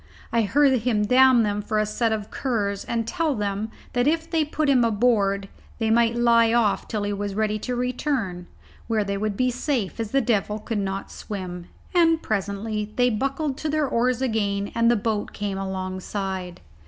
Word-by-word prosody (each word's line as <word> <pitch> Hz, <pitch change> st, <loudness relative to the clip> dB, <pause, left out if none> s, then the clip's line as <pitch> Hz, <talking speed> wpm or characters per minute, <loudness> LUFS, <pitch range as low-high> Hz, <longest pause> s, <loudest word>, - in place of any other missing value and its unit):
I 230 Hz, -, +4 dB
heard 265 Hz, +4 st, +3 dB
him 220 Hz, -3 st, +1 dB
damn 255 Hz, +1 st, +6 dB
them 205 Hz, -1 st, -1 dB
for 215 Hz, +1 st, -2 dB
a 215 Hz, -, +2 dB
set 225 Hz, +2 st, 0 dB
of 210 Hz, -2 st, -3 dB
curs, 205 Hz, -6 st, -1 dB
and 230 Hz, -1 st, -2 dB
tell 325 Hz, -1 st, 0 dB
them 205 Hz, 0 st, -2 dB, 0.2 s
that 245 Hz, +2 st, +2 dB
if 325 Hz, +1 st, +1 dB
they 325 Hz, -2 st, +1 dB
put 305 Hz, 0 st, -1 dB
him 260 Hz, -3 st, +4 dB
aboard 205 Hz, -3 st, +2 dB, 0.3 s
they 225 Hz, -2 st, 0 dB
might 230 Hz, 0 st, +3 dB
lie 235 Hz, -1 st, +4 dB
off 230 Hz, -4 st, +2 dB
till 215 Hz, -2 st, -2 dB
he 205 Hz, 0 st, -1 dB
was 200 Hz, -1 st, -3 dB
ready 215 Hz, 0 st, 0 dB
to 250 Hz, +3 st, -3 dB
return, 245 Hz, -7 st, -2 dB, 0.4 s
where 220 Hz, -2 st, +1 dB
they 200 Hz, 0 st, -2 dB
would 205 Hz, 0 st, -2 dB
be 255 Hz, 0 st, +2 dB
safe, 245 Hz, -5 st, -2 dB
as 225 Hz, -2 st, -2 dB
the 275 Hz, -, +2 dB
devil 210 Hz, -4 st, 0 dB
could 215 Hz, 0 st, -3 dB
not 195 Hz, 0 st, -3 dB
swim; 180 Hz, -4 st, -6 dB, 0.3 s
and 330 Hz, -2 st, +4 dB
presently 210 Hz, +1 st, -2 dB
they 245 Hz, 0 st, +3 dB
buckled 275 Hz, +5 st, -1 dB
to 310 Hz, -, -2 dB
their 305 Hz, -1 st, +1 dB
oars 250 Hz, +1 st, +1 dB
again 205 Hz, -4 st, -1 dB
and 230 Hz, 0 st, +3 dB
the 240 Hz, -, +4 dB
boat 215 Hz, -1 st, -2 dB
came 200 Hz, -2 st, -3 dB
alongside. 190 Hz, -1 st, -4 dB
220 Hz, 190 wpm, -24 LUFS, 200-250 Hz, 0.4 s, damn